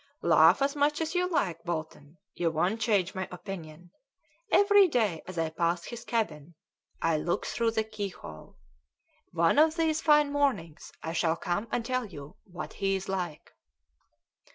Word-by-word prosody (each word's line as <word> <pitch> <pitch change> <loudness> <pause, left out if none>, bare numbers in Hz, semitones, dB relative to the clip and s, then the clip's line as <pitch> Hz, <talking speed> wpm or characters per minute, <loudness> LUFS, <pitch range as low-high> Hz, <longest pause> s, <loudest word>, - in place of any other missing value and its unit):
"Laugh - - +5
as 280 +1 0
much 295 +1 +1
as 320 -1 -2
you 360 0 +1
like, 175 - -1
Bolton, 160 -2 -6 0.2
you 170 -1 0
won't 180 +8 0
change 200 -5 +1
my 185 -1 -4
opinion. 175 -2 -9 0.6
Every 405 -1 +6
day 220 - 0
as 185 -1 -8
I 165 -1 -1
pass 170 +1 -1
his 235 -1 -8
cabin 175 -10 -3 0.5
I 165 -1 +2
look 170 +3 -1
through 230 -1 0
the 220 -1 0
keyhole. 200 - -8 0.7
One 170 - +3
of 315 +1 +5
these 320 -2 +1
fine 300 -2 +4
mornings 250 - -1
I 165 - -4
shall 165 -1 +1
come 180 +6 -2
and 235 - -1
tell 255 -1 -1
you 145 -6 -11
what 180 -2 -8
he's 195 -1 -1
like." 180 -5 -4
190 Hz, 155 wpm, -29 LUFS, 165-255 Hz, 0.7 s, Every